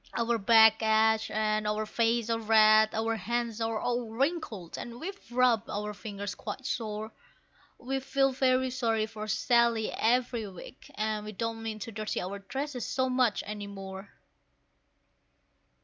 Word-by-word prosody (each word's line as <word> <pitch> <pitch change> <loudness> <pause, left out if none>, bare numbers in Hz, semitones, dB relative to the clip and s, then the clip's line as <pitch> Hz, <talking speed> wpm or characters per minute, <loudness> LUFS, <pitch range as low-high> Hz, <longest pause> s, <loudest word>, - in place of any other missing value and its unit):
Our 235 0 +1
backs 220 +1 +6
ache, 220 0 +3
our 215 0 0
faces 230 +1 0
are 225 - 0
red, 215 0 +5
our 225 +1 0
hands 235 0 -2
are 225 -1 -1
all 240 0 -1
wrinkled, 230 - -2
and 235 0 -7
we've 390 -7 -8
rubbed 245 -3 +2
our 210 +1 -3
fingers 205 -1 -6
quite 265 - -7
sore; 220 -3 -3 0.7
We 270 +2 -3
feel 270 0 +1
very 260 0 +2
sorry 225 -4 0
for 215 -1 -7
Sally 235 0 +2
every 240 -1 +1
week, 185 -3 -12
and 215 0 -1
we 215 0 -7
don't 225 +2 -3
mean 220 -1 -4
to 215 +2 -7
dirty 215 0 -3
our 195 +3 -5
dresses 265 +5 -4
so 260 0 0
much 250 -4 +2
any 210 -1 -6
more. 195 0 -8
225 Hz, 150 wpm, -29 LUFS, 215-240 Hz, 0.7 s, backs